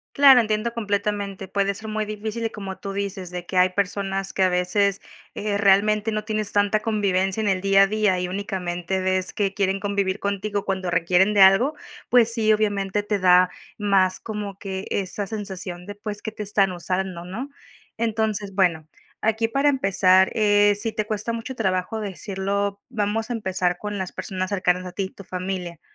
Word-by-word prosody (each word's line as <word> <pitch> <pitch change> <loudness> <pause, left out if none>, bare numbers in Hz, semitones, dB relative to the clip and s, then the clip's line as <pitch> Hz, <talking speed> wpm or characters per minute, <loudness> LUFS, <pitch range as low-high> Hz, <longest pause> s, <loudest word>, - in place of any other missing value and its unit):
Claro, 275 -3 +8
entiendo 215 +1 -1
completamente. 200 -3 -2
Puede 200 0 0
ser 220 +2 -8
muy 215 0 -1
difícil, 215 +2 -5
y - - -3
como 195 -2 -7
tú 195 -1 -6
dices, 195 -2 -4
de 180 -1 -6
que 185 - -5
hay 180 0 +5
personas 195 0 -2
que, 190 - +2
a - - +4
veces, 190 +2 +1 0.3
eh, 205 -1 -2
realmente 210 +2 +3
no 215 0 -1
tienes 215 -1 -2
tanta 205 +1 +2
convivencia 200 -2 0
en 210 - 0
el 190 -1 +1
día 195 0 +5
a - - +6
día 210 -4 +1
y 180 - -2
únicamente 190 -2 -3
ves 185 0 0
que 195 -2 0
quieren 195 -1 0
convivir 200 -1 -1
contigo 200 0 -2
cuando 190 -2 -2
requieren 180 +4 +3
de 200 - +4
algo, 195 +11 +6 0.4
pues 235 -2 +5
sí, 220 -2 +2
obviamente, 205 -1 0
te 205 0 -1
da 180 0 +5 0.3
más 195 -3 +2
como 210 -3 -5
que, 190 -1 -6
esa 200 +1 -2
sensación 190 -4 -5
de, 205 +1 -8
pues, 205 0 -6
que 220 - -4
te 210 -1 -6
están 195 -1 +2
usando, 180 0 -3
¿no? 230 +10 -6 0.5
Entonces, 215 -3 -1
bueno. 170 -5 +1 0.4
Aquí, 225 +1 +2
para 275 +4 +2
empezar, 190 -6 +4
eh, 205 -1 +4
si 225 +1 -3
te 215 -1 -2
cuesta 215 +2 -2
mucho 230 +3 -5
trabajo 190 +1 -1
decirlo, 200 0 -3
vamos 220 +1 -1
a - - 0
empezar 185 -5 -1
con 210 +1 -5
las 190 -2 -4
personas 185 0 -4
cercanas 185 -2 +1
a 180 - -7
ti, 190 0 -3
tu 200 - -13
familia. 180 -2 -5
200 Hz, 185 wpm, -23 LUFS, 190-215 Hz, 0.5 s, Claro